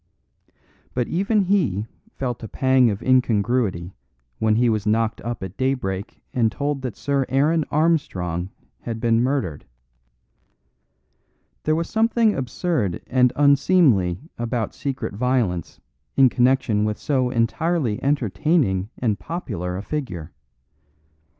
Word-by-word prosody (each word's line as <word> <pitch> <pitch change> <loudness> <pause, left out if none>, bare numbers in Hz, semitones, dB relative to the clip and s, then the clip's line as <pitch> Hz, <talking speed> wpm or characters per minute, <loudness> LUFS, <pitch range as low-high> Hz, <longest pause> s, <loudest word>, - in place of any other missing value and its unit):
But 125 -1 0
even 200 +4 +1
he 180 - +1 0.3
felt 125 -3 -3
a 110 - -6
pang 130 +1 +3
of 100 +1 -4
incongruity 115 -7 +1 0.5
when 110 -1 +2
he 120 +2 +3
was 110 -2 0
knocked 110 +1 +1
up 120 -3 -4
at 95 +1 -7
daybreak 125 -7 -2
and 115 -3 +2
told 145 0 -2
that 130 -4 -4
Sir 140 -1 0
Aaron 150 +4 +2
Armstrong 95 - 0 0.3
had 115 -1 -5
been 115 0 +2
murdered. 125 - -1 2.0
There 155 - +2
was 165 +1 -1
something 225 -1 +2
absurd 125 - -2
and 125 -1 +3
unseemly 140 - +3 0.2
about 120 -1 -2
secret 135 -6 -4
violence 110 - -1 0.4
in 135 -2 +7
connection 125 -4 +2
with 105 0 -1
so 130 -4 0
entirely 125 +1 0
entertaining 135 - +1
and 110 -5 0
popular 95 - -4
a 100 - -5
figure. 90 - -5
125 Hz, 120 wpm, -22 LUFS, 105-145 Hz, 2.0 s, in